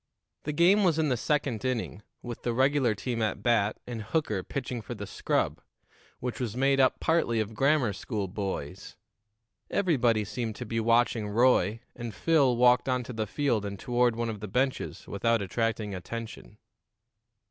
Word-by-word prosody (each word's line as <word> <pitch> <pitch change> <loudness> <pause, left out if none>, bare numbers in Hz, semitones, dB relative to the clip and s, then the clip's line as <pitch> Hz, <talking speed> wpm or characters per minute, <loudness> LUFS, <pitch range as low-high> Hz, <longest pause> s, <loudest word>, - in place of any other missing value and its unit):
The 150 - -1
game 180 +7 +4
was 170 -4 +3
in 155 -2 +2
the 130 - +2
second 135 -2 -1
inning, 125 -5 -2 0.2
with 120 -2 -6
the 120 - -1
regular 130 -2 +2
team 115 +3 -3
at 105 -1 -1
bat 110 -3 +2
and 120 -2 -5
Hooker 110 -3 -1
pitching 125 -3 -4
for 100 - -7
the - - -6
scrub, - - -1 0.6
which 125 -1 -4
was 120 -2 -3
made 135 +1 +3
up 130 - +3
partly 160 -9 +1
of 110 0 -2
grammar 135 -2 +2
school 100 0 -3
boys. 95 -7 -5 0.7
Everybody 125 - +2
seemed 110 +1 -4
to 120 - -6
be 115 +1 -2
watching 115 -1 +2
Roy, 115 -1 +3
and 120 -2 -6
Phil 140 -7 +3
walked 125 +2 +4
on 125 -1 +1
to 125 - -7
the 110 -1 -2
field 120 -3 0
and 100 -1 -5
toward 120 -1 +1
one 115 0 -2
of 105 - -7
the 105 - -6
benches 130 +6 -2
without 115 +3 +1
attracting 110 +1 -2
attention. 110 - -7
120 Hz, 170 wpm, -28 LUFS, 110-130 Hz, 0.7 s, game